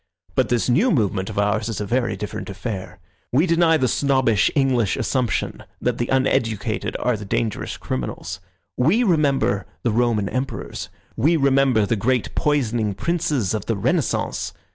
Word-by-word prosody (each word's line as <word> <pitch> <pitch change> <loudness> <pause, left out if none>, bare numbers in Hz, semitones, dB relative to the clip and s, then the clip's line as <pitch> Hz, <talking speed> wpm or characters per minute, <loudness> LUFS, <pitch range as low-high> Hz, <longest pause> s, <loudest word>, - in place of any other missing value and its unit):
But - - +1
this 120 -2 +1
new 160 - +3
movement 100 - +1
of 105 - -7
ours 105 +2 +1
is 115 - -3
a 105 - -2
very 120 +3 0
different 105 - -5
affair. 95 -1 -5 0.3
We 145 +8 +3
deny 165 -2 +4
the 130 -3 +1
snobbish 130 -6 +2
English 130 -7 +2
assumption 125 -3 -1 0.2
that 125 -1 -1
the 120 - 0
uneducated 115 -5 0
are 125 -1 +1
the 105 - -7
dangerous 105 +2 -2
criminals. 75 +8 -4 0.4
We 170 - +3
remember 140 - +2 0.2
the 120 - +2
Roman 115 -3 +1
Emperors. 130 +5 -4 0.3
We 160 +8 +3
remember 135 -6 +3
the 115 - 0
great 125 +3 0
poisoning 120 -8 0
princes 140 - 0
of 105 -3 -3
the 115 - +1
Renaissance. 100 - -1
120 Hz, 155 wpm, -22 LUFS, 105-135 Hz, 0.4 s, deny